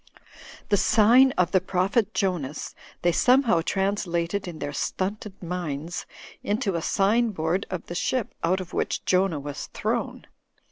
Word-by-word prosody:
The 205 - +4
'sign 240 +7 +5
of 180 -2 +1
the 190 - +3
Prophet 195 +4 +1
Jonas/ 165 -8 -2 0.3
they 175 - +4
somehow 245 -2 +4
translated 190 -1 -1
in 170 -3 -6
their 145 -1 -4
stunted 195 +4 -3
minds 170 -2 -4 0.3
into 205 -1 -1
a 170 - -1
sign 220 +7 +2
board 175 -1 -1
of 185 -2 -5
the - - -7
ship 235 +6 -1
out 180 +3 +2
of 185 -2 -8
which - - -2
Jonah 185 -4 +2
was 145 0 -6
thrown. - - -2
185 Hz, 145 wpm, -25 LUFS, 170-205 Hz, 0.3 s, sign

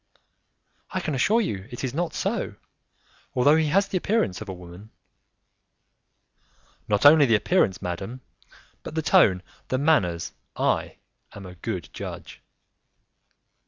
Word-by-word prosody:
"I 185 - -2
can 155 -4 -3
assure 210 - +3
you 100 - -4
it 120 0 -7
is 130 -2 -2
not 170 +3 -2
so, - - -2 0.8
although 140 +4 +5
he 160 -1 +2
has 195 +6 +2
the 190 - -1
appearance 185 - 0
of 105 - -7
a - - -4
woman." 90 +3 -12 2.0
"Not 105 +3 +1
only 145 -1 +8
the 115 - +4
appearance, 105 - +1
madam, 95 +8 -5 0.6
but - - -8
the 160 - -1
tone, 110 - +4 0.2
the 130 - 0
manners; 115 - +1 0.2
I - - 0 0.4
am 100 - -10
a 90 - -9
good 90 - -5
judge." - - -8
130 Hz, 135 wpm, -25 LUFS, 95-160 Hz, 2.0 s, only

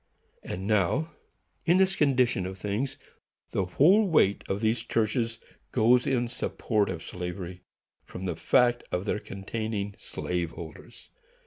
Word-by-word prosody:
And 95 +2 -5
now, 110 - +1 0.5
in 175 +2 +4
this 190 0 +3
condition 125 - +2
of 95 0 -7
things, 105 +8 -2 0.5
the 95 - 0
whole 185 - +5
weight 100 - +3
of 95 - 0
these 110 +1 +1
churches 115 0 0 0.3
goes 125 +2 +4
in 125 -3 +1
support 110 -2 -1
of 85 -3 -4
slavery, 90 0 -6 0.4
from 95 - -8
the 90 -3 -1
fact 120 +7 +3
of 90 +2 -1
their 105 - 0
containing 105 +1 -4
slave 90 -2 -3
holders. 80 -2 -11
110 Hz, 135 wpm, -28 LUFS, 95-125 Hz, 0.5 s, whole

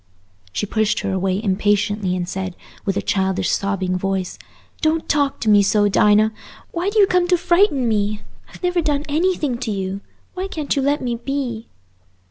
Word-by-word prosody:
She 210 - -2
pushed 215 +1 0
her 200 - -2
away 190 0 0
impatiently, 205 -1 +1
and 175 -1 -3
said, 185 -1 -4 0.3
with 195 -1 0
a - - -1
childish 190 -2 0
sobbing 195 -2 -1
voice, 190 0 -2 0.4
"Don't 315 0 +1
talk 285 -2 +1
to 225 - -3
me 205 -1 +6
so, 205 +1 +3
Dinah. 210 +2 +4 0.4
Why 345 +3 -1
do 425 - -3
you 410 - +7
come 360 -2 +2
to 360 0 +3
frighten 345 - +3
me? 210 -1 0 0.3
I've - - -15
never 355 -1 +1
done 295 -2 0
anything 305 -5 0
to 245 - -3
you. 195 -1 -3 0.3
Why 375 +1 -3
can't 305 -6 -2
you 275 - +1
let 285 +2 +1
me 240 -2 -1
be?" 245 -3 -4
220 Hz, 180 wpm, -20 LUFS, 195-300 Hz, 0.4 s, you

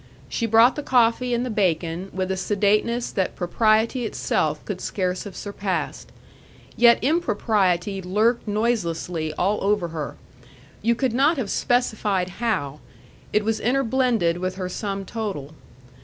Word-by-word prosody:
She 230 - -2
brought 225 +3 +5
the 295 - -3
coffee 245 -1 +2
and 240 +1 0
the 250 - -3
bacon 180 -2 0
with 185 0 -2
a - - 0
sedateness 210 +5 +1
that 190 -3 -1
propriety 220 +6 +2
itself 220 - -1
could - - -5
scarce 185 -1 -2
have 200 - -8
surpassed. 200 -2 -4 0.6
Yet 235 -1 +6
impropriety 205 - +1
lurked 215 +6 +1
noiselessly 180 -7 -1
all 200 +6 0
over 200 -3 +1
her. 155 -3 -5 0.7
You 235 +2 +2
could 255 -1 0
not 285 +6 +3
have 235 -7 -2
specified 210 -6 0
how; 150 -11 -1 0.5
it 210 0 +1
was 220 0 0
interblended 245 -8 +1
with 185 +1 -2
her 185 -1 -4
sum 195 0 -4
total. 190 -10 -5
210 Hz, 140 wpm, -23 LUFS, 185-235 Hz, 0.7 s, Yet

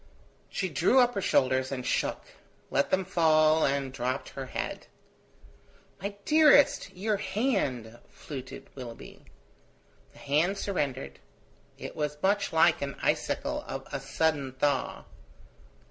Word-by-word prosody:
She 190 - -2
drew 170 - +2
up 245 -1 +4
her 200 - -2
shoulders 130 -4 +2
and 130 -2 -4
shook; - - -1 0.5
let 140 - +1
them 190 0 +1
fall 155 -3 +4
and 135 -1 -1
dropped 130 +1 -3
her 135 -1 -7
head. - - -5 1.1
"My 200 +1 -4
dearest! 300 -2 +5
your 210 +2 0
hand!" 190 - -1
fluted 135 -3 -9
Willoughby. 120 -4 -10 0.9
The - - -19
hand 160 +8 +1
surrendered; 135 - -3 0.6
it - - -8
was 150 -1 -2
much 200 +1 +2
like 160 0 +4
the 140 -1 -4
icicle - - 0
of - - -6
a - - -1
sudden 145 -5 -1
thaw. 135 0 -1
150 Hz, 125 wpm, -28 LUFS, 130-195 Hz, 1.1 s, dearest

